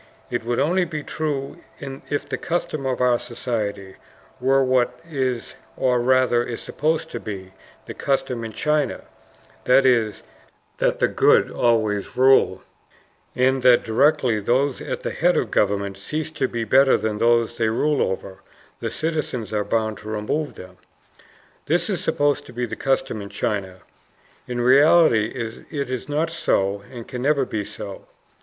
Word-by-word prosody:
It 120 -1 -2
would 120 +1 -1
only 175 +7 +2
be 155 -3 -5
true 145 -1 -3 0.2
if 140 +1 -5
the - - -3
custom 155 -5 -2
of 130 -1 -1
our 125 -1 +3
society 105 -5 -4 0.4
were 135 +1 +3
what 130 -1 +1
is, 130 -6 -2 0.2
or 125 -1 +2
rather 125 -1 +3
is 120 -1 -5
supposed 155 +2 -2
to - - -4
be, 95 -3 -7 0.3
the - - -7
custom 130 -3 -1
in 115 - -5
China; 150 +5 0 0.6
that 135 +2 +5
is, 115 -5 +2 0.6
that - - +1
the - - +3
good - - +3
always 110 -4 0
rule, 130 +1 +4 0.7
and 130 +1 +2
that 125 -1 +5
directly 120 -1 +2
those 130 +6 +1
at - - -4
the - - -3
head 175 +2 +2
of 115 - -1
government 100 -1 0
cease 155 +9 -4
to 155 - -1
be 120 -2 -3
better 135 +5 +5
than 105 -1 -2
those 120 0 +2
they 110 -1 +2
rule 145 +6 +1
over, 95 0 -3 0.4
the - - -3
citizens 155 -9 -3
are 105 -1 +1
bound 110 0 -1
to 105 - -12
remove 110 +8 -2
them. 90 0 -12 0.9
This - - +1
is - - -2
supposed 145 -1 +1
to - - -12
be 120 +1 -2
the 120 - -6
custom 135 -4 -1
in 100 - -8
China. 100 -2 -3 0.7
In 120 -1 -2
reality 135 -3 +5 0.4
it 140 -4 -3
is 130 +2 -4
not 155 +3 0
so 100 -11 0
and 120 -3 -9
can 125 - -6
never 140 0 +2
be 110 -4 -3
so. - - -9
125 Hz, 160 wpm, -22 LUFS, 110-140 Hz, 0.9 s, that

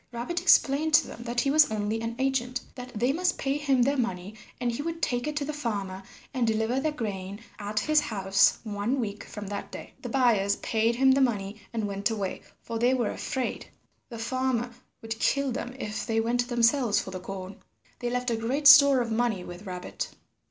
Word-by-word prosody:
Rabbit 250 +9 -3
explained 305 -2 +4
to 315 - +5
them - - -9
that 240 0 0
he 275 - +1
was 305 +1 +6
only 215 +1 -2
an 230 0 -3
agent, 260 -2 0
that 250 -1 -9
they 245 +5 +1
must 355 +2 0
pay 270 0 -1
him 275 -4 +2
their 280 +2 +1
money, 190 -4 -2 0.3
and 245 -1 0
he 235 - -4
would 330 +2 -4
take 245 -4 -1
it 300 - -3
to 295 -1 -1
the 305 - -4
farmer, 200 -9 -3 0.3
and 250 -4 +1
deliver 225 +3 +1
their 310 +3 0
grain 205 -7 -5 0.2
at 210 +1 -2
his 310 0 +3
house 195 -4 +2
one 215 +4 -2
week 205 -3 -4
from 210 -1 -8
that 200 0 -6
day. - - -9
The - - -6
buyers 220 -7 +3
paid 225 0 0
him 265 +2 +5
the 270 +1 +3
money 210 -4 -1
and 220 -3 -2
went 200 +2 -1
away, 205 -4 -3 0.2
for 230 -1 -4
they 245 +3 +3
were 240 -4 0
afraid 260 -2 -3 0.4
the 235 - -7
farmer 245 +1 -1 0.3
would 225 0 -5
kill 275 +1 +1
them 250 0 -5
if 215 -5 -4
they 225 0 +1
went 240 +2 0
themselves 240 -1 +3
for 190 - -6
the 185 - -5
corn. 190 +1 -7 0.4
They 245 - -2
left 250 0 -1
a - - +1
great 250 +7 -2
store 280 -2 +9
of 230 -1 -3
money 220 -5 0
with 175 +3 -10
Rabbit. 180 -1 -5
235 Hz, 210 wpm, -27 LUFS, 210-265 Hz, 0.4 s, store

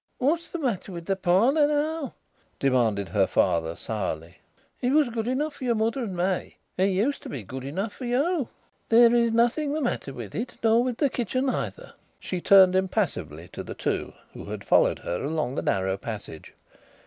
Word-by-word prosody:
"What's 320 +6 0
the - - -4
matter 235 - -2
with 170 -2 -7
the 195 - 0
parlour 220 - +3
now?" 300 -1 -1 0.4
demanded 115 -7 +1
her 100 -3 +2
father 80 0 +1
sourly. 85 -7 -4 0.4
"It 250 +2 +1
was 300 -4 +4
good 230 -1 -3
enough 285 +4 -1
for 275 - -10
your 235 -2 +2
mother 225 +4 0
and 195 -7 -4
me. 185 +1 -1 0.2
It 185 - +2
used 200 +9 +1
to - - -8
be 130 -6 -5
good 130 +6 -7
enough 190 +10 -3
for 255 - -7
you." 275 +4 0 0.4
"There 235 +1 +7
is 235 -1 +3
nothing 240 +6 +2
the 310 - -1
matter 240 - -2
with 120 -6 -8
it, 235 +4 -4
nor 225 +1 +4
with 250 -2 -2
the 285 -3 +2
kitchen 255 +3 -1
either." - - -5 0.3
She 180 -2 -4
turned 190 -1 +7
impassively 175 - -1
to - - -7
the - - -7
two - - -2 0.2
who - - -9
had - - -6
followed - - +4
her 90 - -4
along 150 -3 -1
the - - -2
narrow 95 0 0
passage. 105 -7 -8
215 Hz, 190 wpm, -26 LUFS, -, 0.4 s, There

